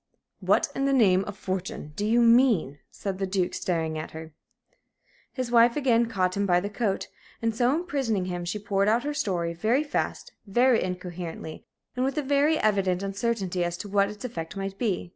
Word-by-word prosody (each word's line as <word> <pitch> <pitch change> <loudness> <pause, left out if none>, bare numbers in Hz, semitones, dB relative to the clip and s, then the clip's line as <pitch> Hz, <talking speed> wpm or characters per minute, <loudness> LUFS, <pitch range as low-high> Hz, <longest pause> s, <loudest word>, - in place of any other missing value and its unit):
"What - - +2
in 275 - -1
the 275 - +2
name 195 -7 +4
of 205 0 -7
fortune 185 -5 -4
do 205 - -1
you 235 +2 +4
mean?" 230 - +4
said 195 -2 -5
the 195 - -1
Duke, 185 -1 0
staring 160 -3 -2
at 155 - -6
her. 160 -1 -9 1.0
His 255 -2 -4
wife 235 0 +5
again 240 -5 +2
caught 185 -5 0
him 200 0 0
by 175 -1 +4
the 200 +3 -4
coat, 205 -3 -1 0.3
and, 225 -1 -1
so 245 +2 +3
imprisoning 275 - -1
him, 175 -1 -4
she 175 +4 -3
poured 200 -1 0
out 230 +3 +3
her 295 +1 -2
story 175 -10 -1
very 225 - +1
fast, 295 - -3 0.2
very 240 +4 +3
incoherently, 180 -3 -6 0.3
and 250 - 0
with 270 +2 -1
a 300 - +1
very 285 +3 +3
evident 195 - +1
uncertainty 195 -3 -1
as 175 0 -2
to 205 - -7
what 200 0 +2
its 210 +4 -8
effect 180 -6 -6
might 195 0 -5
be. 205 -7 -1
200 Hz, 195 wpm, -26 LUFS, 180-240 Hz, 1.0 s, wife